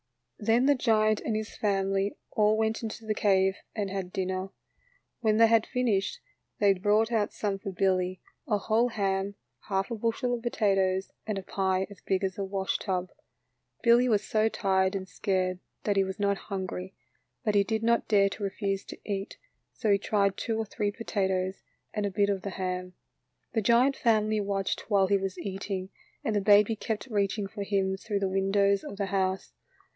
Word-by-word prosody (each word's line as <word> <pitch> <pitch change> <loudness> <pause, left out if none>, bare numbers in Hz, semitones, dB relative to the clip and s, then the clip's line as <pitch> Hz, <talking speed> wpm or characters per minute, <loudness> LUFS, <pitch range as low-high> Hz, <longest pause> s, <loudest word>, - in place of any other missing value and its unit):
Then 225 +3 +3
the 285 - +6
giant 215 -4 +2
and 220 - -1
his 215 0 -4
family 195 -1 0 0.2
all 215 0 +3
went 220 0 0
into 225 0 -6
the 215 - 0
cave 190 -2 +2 0.2
and 205 -3 -2
had 190 -2 -4
dinner. 185 -1 -2 0.7
When 215 -2 +2
they 230 - +7
had 225 -1 +3
finished, 250 - 0 0.4
they 200 -1 +5
brought 210 +4 +2
out 220 -3 +1
some 200 -2 -2
for 195 - -5
Billy 185 0 +1
— - - -47
a 210 - +3
whole 220 +4 +2
ham, 195 -2 -1 0.3
half 195 +2 -1
a - - -1
bushel 230 +2 -1
of 240 - -2
potatoes, 195 -5 +1 0.2
and 215 -2 -1
a 195 - -4
pie 190 0 0
as 200 - -13
big 190 0 0
as 190 0 -2
a - - 0
washtub. 190 -1 -2 0.7
Billy 240 +1 +5
was 210 -3 +2
so 220 0 +2
tired 190 -2 +1
and 190 -1 -4
scared 185 0 -1 0.2
that 205 - +1
he 195 - +5
was 190 +1 -5
not 200 -1 +2
hungry, 190 -1 -4 0.5
but 210 - +2
he 200 -1 +5
did 220 +2 -2
not 235 0 +2
dare 200 -2 +4
to 205 - -7
refuse 195 0 -2
to - - -9
eat, 200 -1 -4 0.3
so 220 -4 0
he 200 - +4
tried 200 -2 +1
two 225 +1 -2
or 225 - -1
three 205 0 -2
potatoes 190 -3 -1 0.3
and 210 -1 0
a - - -1
bit 200 +1 +1
of 195 -2 -2
the 200 - -4
ham. 185 -1 -4 0.6
The 225 - +1
giant 240 +5 +4
family 215 -2 +2
watched 200 0 -2
while 200 -2 +4
he 200 +1 +3
was 190 -1 -3
eat 195 +1 -5
ing, 190 -1 -3 0.3
and 220 - 0
the 205 - +2
baby 210 +2 +5
kept 215 0 -3
reaching 205 -3 0
for 205 +1 -7
him 195 -1 0
through 200 0 -3
the 195 - +2
windows 195 +1 +2
of 200 - -7
the 200 - 0
house. 190 -1 -1
200 Hz, 190 wpm, -28 LUFS, 190-215 Hz, 0.7 s, they